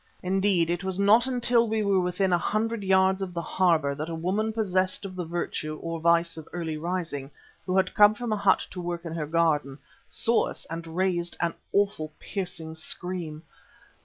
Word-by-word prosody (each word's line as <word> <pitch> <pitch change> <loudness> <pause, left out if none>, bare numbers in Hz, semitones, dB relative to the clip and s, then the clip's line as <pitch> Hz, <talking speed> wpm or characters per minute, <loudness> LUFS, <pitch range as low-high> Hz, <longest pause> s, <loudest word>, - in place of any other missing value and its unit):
Indeed 185 -2 +2
it 175 +2 -2
was 190 -1 -1
not 215 +5 +5
until 240 -2 +2
we 220 0 0
were 200 -2 +3
within 180 +1 +1
a - - +5
hundred 225 +3 -1
yards 190 0 +3
of 180 -2 -4
the 170 - -1
harbour 160 -5 +2
that 155 +3 -5
a 165 - -3
woman 195 +7 -1
possessed 190 -3 0
of 185 -1 -7
the 180 -2 -3
virtue, 160 -2 -3
or 165 0 -4
vice, 170 0 +2
of 160 - -9
early 165 -3 -3
rising, 160 -4 -3 0.4
who 185 +1 +1
had 190 -1 +2
come 210 0 +6
from 240 -1 -2
a - - +2
hut 200 -2 +3
to 180 - -6
work 175 0 -4
in 165 - -5
her 155 -3 -3
garden, 150 -4 +1 0.3
saw 230 +1 +2
us - - -6
and 165 0 -5
raised 175 -2 0
an 170 -1 0 0.2
awful, 200 -6 +1
piercing 170 -5 -5
scream. 160 -1 -4
180 Hz, 190 wpm, -27 LUFS, 165-200 Hz, 0.4 s, come